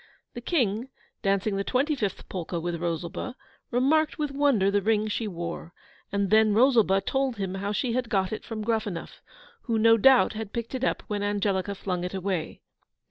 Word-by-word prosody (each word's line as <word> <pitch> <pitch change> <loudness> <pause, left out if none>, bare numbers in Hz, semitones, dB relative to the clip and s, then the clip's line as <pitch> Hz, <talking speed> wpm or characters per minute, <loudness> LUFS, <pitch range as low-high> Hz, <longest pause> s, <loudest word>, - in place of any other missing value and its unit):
The 240 - -7
King, 240 - 0 0.3
dancing 195 0 +1
the 195 - 0
twenty 270 +8 +1
fifth 210 -9 -3
polka 175 -1 -4
with 170 0 -3
Rosalba, 170 +8 -3 0.3
remarked 295 +6 +2
with 295 -2 -2
wonder 275 -9 +2
the 205 0 +2
ring 215 +1 +1
she 215 +1 -2
wore; 170 -2 -6 0.4
and 200 -1 0
then 215 -1 +5
Rosalba 225 -6 +4
told 265 +1 -1
him 190 -2 -3
how 200 +1 -3
she 235 +3 -1
had 250 -1 -1
got 195 -3 0
it - - -5
from 220 -2 -5
Gruffanuff, 215 -6 -3 0.4
who 230 -3 0
no 225 +1 +6
doubt 260 +2 +5
had 215 -1 -6
picked 235 +1 -4
it 260 -1 -3
up - - 0
when 205 -1 -3
Angelica 200 -1 0
flung 180 -2 -3
it 180 +2 -4
away. 185 -3 -3
210 Hz, 185 wpm, -27 LUFS, 195-240 Hz, 0.4 s, no